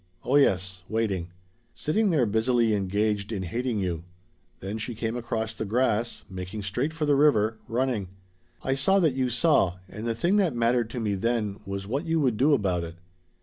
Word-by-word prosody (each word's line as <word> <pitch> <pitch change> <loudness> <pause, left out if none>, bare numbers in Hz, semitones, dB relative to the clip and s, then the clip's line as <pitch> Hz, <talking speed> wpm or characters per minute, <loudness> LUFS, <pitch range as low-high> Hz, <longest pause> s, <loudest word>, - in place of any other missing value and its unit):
Oh 130 - +1
yes 95 -9 +2
waiting. 100 -6 -1 0.5
Sitting 210 +7 +1
there 150 -8 +3
busily 115 +1 +2
engaged 105 +1 0
in 100 -4 -2
hating 120 +6 -2
you. 90 -4 -2 0.6
Then 100 +4 -5
she 115 +2 -4
came 115 +1 -2
across 115 -2 -2
the 110 - -4
grass 115 +1 0
making 95 +2 -6
straight 120 +10 -1
for 160 -1 -2
the 145 - +3
river 115 -7 +3
running. 120 -4 -1 0.6
I 135 - +1
saw 140 +9 +3
that 165 -8 +3
you 130 -1 0
saw, 120 - +3
and 105 +5 -6
the 115 - 0
thing 175 - +2
that 180 -10 +2
mattered 120 0 +2
to 120 - -5
me 105 -3 0
then 105 0 -1
was 100 0 -4
what 135 +10 -3
you 165 0 +2
would 130 -7 +1
do 145 +4 +4
about 90 -6 0
it. 85 0 -7
115 Hz, 190 wpm, -26 LUFS, 100-130 Hz, 0.6 s, do